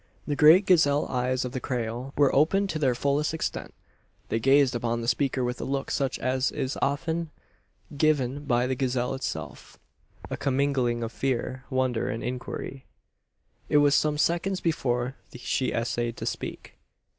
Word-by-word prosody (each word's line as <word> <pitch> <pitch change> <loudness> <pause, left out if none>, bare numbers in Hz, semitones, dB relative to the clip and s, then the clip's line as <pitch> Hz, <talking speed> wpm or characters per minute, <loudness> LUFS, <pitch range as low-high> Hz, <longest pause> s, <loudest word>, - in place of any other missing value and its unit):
The 145 - -1
great 160 +7 +7
gazelle 150 -6 +4
eyes 125 0 0
of 125 - -4
the 130 - -3
Creole 125 +1 -3
were 140 -2 +4
opened 190 +8 +3
to 155 - -3
their 130 -4 +2
fullest 145 +4 0
extent. 160 - -4 0.6
They 115 - 0
gazed 135 +2 +4
upon 120 0 -1
the 115 - -5
speaker 130 +2 +1
with 125 0 -3
a - - -2
look 135 0 -2
such 135 -3 0
as 130 +1 0
is 130 - -3
oft 140 +2 0 0.9
given 145 -2 +1
by 125 -2 +2
the 130 - 0
gazelle 125 -1 -1
itself 80 - -6 0.5
a - - -4
commingling 130 -4 0
of 115 - -4
fear, 130 0 -2
wonder, 130 -3 0
and 115 - -4
inquiry. 130 +1 -5 0.8
It 150 - +4
was 145 -1 +5
some 150 0 +2
seconds 175 +5 +1
before 125 -6 -1 0.2
she 130 +1 -1
essayed 120 0 -2
to - - -5
speak. - - -6
130 Hz, 160 wpm, -27 LUFS, 125-145 Hz, 0.9 s, great